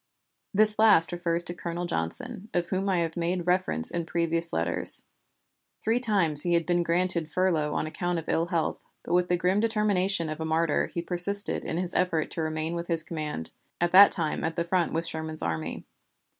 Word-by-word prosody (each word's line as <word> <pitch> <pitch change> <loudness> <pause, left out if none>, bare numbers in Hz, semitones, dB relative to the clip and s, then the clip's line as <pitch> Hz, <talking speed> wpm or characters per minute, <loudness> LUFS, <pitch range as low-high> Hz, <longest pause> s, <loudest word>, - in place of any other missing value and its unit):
This 215 +1 +3
last 205 -7 +6
refers 175 -1 -1
to 175 - -5
Colonel 175 0 -5
Johnson, 225 +4 -4
of 175 -1 -1
whom 195 +1 -2
I 185 - +1
have 165 -1 -2
made 175 0 -2
reference 180 - -1
in 170 -1 -4
previous 170 0 -1
letters. - - +1 0.7
Three 230 +2 0
times 190 - +6
he 175 +1 +3
had 170 -1 0
been 175 -1 0
granted 170 -1 -1
furlough 160 -3 -1
on - - -2
account 175 +2 -3
of 165 - -7
ill 165 +1 -1
health, 170 -3 -3 0.2
but - - -5
with 180 0 +1
the 175 - +1
grim 180 +3 0
determination 205 -5 0
of 155 0 -6
a - - -4
martyr, 160 -1 0
he 170 - -6
persisted 195 +4 +1
in - - -4
his 180 0 -4
effort 170 -4 -1
to 165 - -4
remain 155 +1 -3
with 170 0 -5
his 165 -2 +4
command, 155 - -5 0.3
at 175 0 0
that 200 +2 +8
time 160 -3 +3
at 160 0 -3
the 170 - -1
front 175 -1 0
with 165 +1 -2
Sherman's 160 -1 -5
army. 80 -1 -5
170 Hz, 200 wpm, -26 LUFS, 160-185 Hz, 0.7 s, that